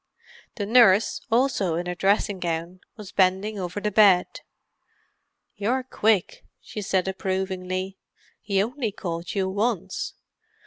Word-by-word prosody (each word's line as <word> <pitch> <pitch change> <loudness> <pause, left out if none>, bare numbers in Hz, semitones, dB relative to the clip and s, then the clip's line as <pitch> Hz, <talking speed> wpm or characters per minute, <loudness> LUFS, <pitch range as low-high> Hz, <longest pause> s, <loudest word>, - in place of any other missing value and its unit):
The 205 - -3
nurse, 220 -2 +4
also 225 -8 +1
in 175 +1 -2
her 180 - -2
dressing 195 +1 +1
gown, 170 +1 -3 0.2
was 205 -3 -9
bending 195 +3 +1
over 180 +2 -4
the 210 +1 -2
bed. 195 -3 +4 1.1
"You're 235 +6 -1
quick," 220 -6 0 0.2
she 210 - -7
said 190 -1 0
approvingly. 190 0 -3 0.4
"He 195 -1 +1
only 240 0 -3
called 170 -3 -5
you 190 -1 0
once. 195 -1 -2
195 Hz, 125 wpm, -25 LUFS, 185-210 Hz, 1.1 s, nurse